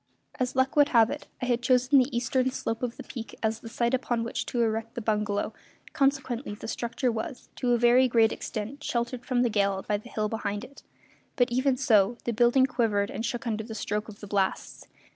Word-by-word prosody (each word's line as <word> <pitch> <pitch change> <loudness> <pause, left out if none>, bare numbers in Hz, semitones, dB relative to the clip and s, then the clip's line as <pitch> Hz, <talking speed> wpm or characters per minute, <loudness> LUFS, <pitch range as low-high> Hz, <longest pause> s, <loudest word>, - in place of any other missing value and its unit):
As 255 0 -1
luck 260 +1 +2
would 290 -1 +5
have 230 -1 +5
it, 295 - -6 0.2
I - - +1
had 245 -1 +1
chosen 255 +2 +4
the 255 -1 +1
eastern 255 +2 +1
slope 225 -3 -3
of 245 -2 -3
the - - -7
peak 230 -3 -8
as 220 0 0
the 230 - -9
site 235 +1 0
upon 245 -2 0
which 230 - -3
to 245 - -2
erect 225 0 -2
the - - -2
bungalow, 210 -2 -1 0.4
consequently 270 -5 0
the - - -8
structure 240 +2 -1
was, 235 +5 -5
to 245 -1 +1
a - - +4
very 240 +2 +5
great 230 -2 +4
extent, 230 +7 -5
sheltered 240 0 -2
from 245 -1 +1
the 240 - +2
gale 200 -2 +1
by 210 - +1
the 215 +4 -12
hill 215 -2 -1
behind 205 -1 -3
it; 275 +2 -12 0.5
but, 245 -3 +2
even 260 +1 +2
so, 230 -3 +3
the 235 - -1
building 240 +3 +4
quivered 220 -6 0
and 225 - -3
shook 240 0 -4
under 220 -2 -2
the 220 0 -8
stroke 210 +1 -3
of 210 - -12
the 205 - -8
blasts. 195 -1 -2
235 Hz, 220 wpm, -27 LUFS, 220-255 Hz, 0.5 s, would